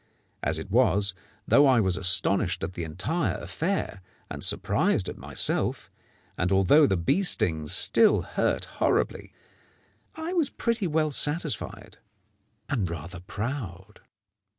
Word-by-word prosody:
As 80 +1 0
it 80 +4 -8
was, 105 -5 +2 0.3
though 145 0 +5
I 130 -3 +4
was 95 -4 +1
astonished 90 0 +1
at 90 - -4
the 85 - -5
entire 95 - -2
affair 165 - -3 0.3
and - - -5
surprised - - +1
at - - -5
myself, - - -1 0.5
and 90 - 0
although 95 - +5
the 95 - 0
bee 85 - +1
stings 80 - +1
still - - +4
hurt - - -1
horribly, - - -1 0.8
I 320 +3 -5
was 325 -6 +1
pretty 230 -7 -2
well 155 -1 0
satisfied 145 -1 -1 0.7
and 115 - -1
rather 85 +2 -7
proud. 105 0 -6
105 Hz, 130 wpm, -26 LUFS, -, 0.8 s, though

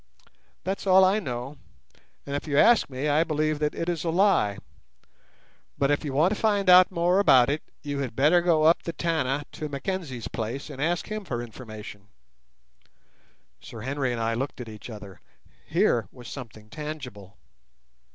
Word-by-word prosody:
That's 195 +1 -3
all 190 0 +7
I 195 +3 +3
know; 130 - -5 0.7
and 140 - -4
if 145 - -4
you 140 -2 0
ask 235 +2 +5
me, 135 +2 -3
I 150 +2 +3
believe 155 -1 -1
that 150 0 -1
it 165 - -3
is 170 -3 -2
a 170 - -1
lie; 170 - +2 1.2
but 140 0 +2
if 145 - 0
you 145 - -3
want 160 +9 +3
to - - -5
find 205 -4 +3
out 180 0 +8
more 175 +1 +2
about 135 -9 +5
it, 150 - -2 0.2
you 145 -1 -3
had 130 -5 -4
better 155 +7 +4
go 165 -3 +2
up 165 +2 +5
the 170 - -5
Tana 150 -5 -1
to 155 - -6
Mackenzie's 140 - -4
place 120 +7 -5
and 135 -1 -7
ask 170 +3 0
him 215 -1 -3
for 125 -10 -4
information." 110 -4 -10 1.5
Sir 120 -3 -10
Henry 135 +1 -2
and 120 - -3
I 115 0 0
looked 135 +5 -4
at 125 - -7
each 110 +2 -10
other. 100 - -10 0.5
Here - - +2
was 125 -3 -12
something 110 -5 -10
tangible. 130 -11 -8
145 Hz, 175 wpm, -26 LUFS, 120-170 Hz, 1.5 s, out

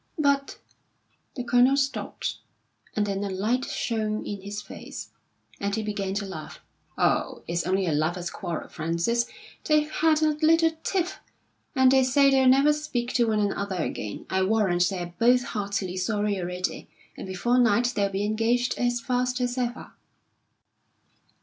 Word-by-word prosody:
"But 280 -2 +1 0.4
" - - -43
the 250 - -3
Colonel 245 +3 +4
stopped, 275 -1 -2 0.6
and 210 - +1
then 200 0 -2
a 200 - -2
light 215 +7 0
shone 215 -2 -2
in 205 -2 -5
his 205 +2 -5
face, 210 - -9 0.5
and 200 0 -1
he 220 - -2
began 200 -2 -3
to 205 0 -2
laugh. 160 -5 -8 0.4
"Oh, - - +1
it's 170 +1 -1
only 190 +1 +1
a 165 - 0
lovers' 170 +4 -1
quarrel, 175 -3 -5
Frances. 170 +9 -1 0.4
They've 305 -1 +2
had 315 0 +2
a 310 - +4
little 325 +2 +3
tiff, 385 +1 -1 0.6
and 260 -1 +5
they 265 0 +5
say 275 +2 +4
they'll 265 -1 +4
never 275 +3 +6
speak 255 -5 -3
to 235 -2 +3
one 215 -1 +1
another 200 -1 -1
again. 105 -7 -5
I 190 - 0
warrant 190 -3 +2
they're 175 -2 -5
both 245 +2 +5
heartily 200 -4 -3
sorry 205 +1 0
already, 180 0 -4 0.3
and - - -7
before 240 +7 +1
night 240 +1 +3
they'll 200 -1 +1
be 195 +1 -2
engaged 230 +3 +1
as 245 -1 +1
fast 250 +1 0
as 245 -1 -1
ever." 245 -1 -3
220 Hz, 160 wpm, -26 LUFS, 195-255 Hz, 0.6 s, never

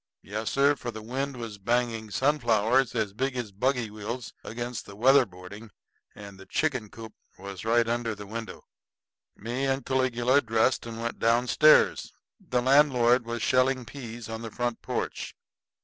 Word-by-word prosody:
Yes, 105 +2 -4
sir, 140 +1 +3
for 120 -2 -6
the 110 -2 -7
wind 135 +3 -3
was 115 -4 -7
banging 115 0 -1
sunflowers 125 -1 +2
as 110 -4 -1
big 130 +4 -2
as 115 -4 -4
buggy 120 +2 -1
wheels 110 +3 -6
against 120 +1 -5
the 100 - -10
weatherboarding 110 -5 +1 0.5
and 100 -1 -11
the 95 - -13
chicken 135 -8 -1
coop 110 0 -10 0.2
was 100 0 -8
right 115 +1 +3
under 115 -1 -1
the 105 0 -9
window. 115 +2 -7 0.7
Me 120 +5 -3
and 135 0 -1
Caligula 130 0 +2
dressed 115 +1 +1
and 115 -1 -7
went 115 0 -4
down 115 +2 +3
stairs. 155 +4 +4 0.3
The 125 -1 -1
landlord 125 -3 +4
was 120 -1 -3
shelling 130 0 +2
peas 120 -2 -8
on 115 0 -6
the 115 - -6
front 120 +1 -3
porch. - - -4
120 Hz, 160 wpm, -27 LUFS, 110-130 Hz, 0.7 s, stairs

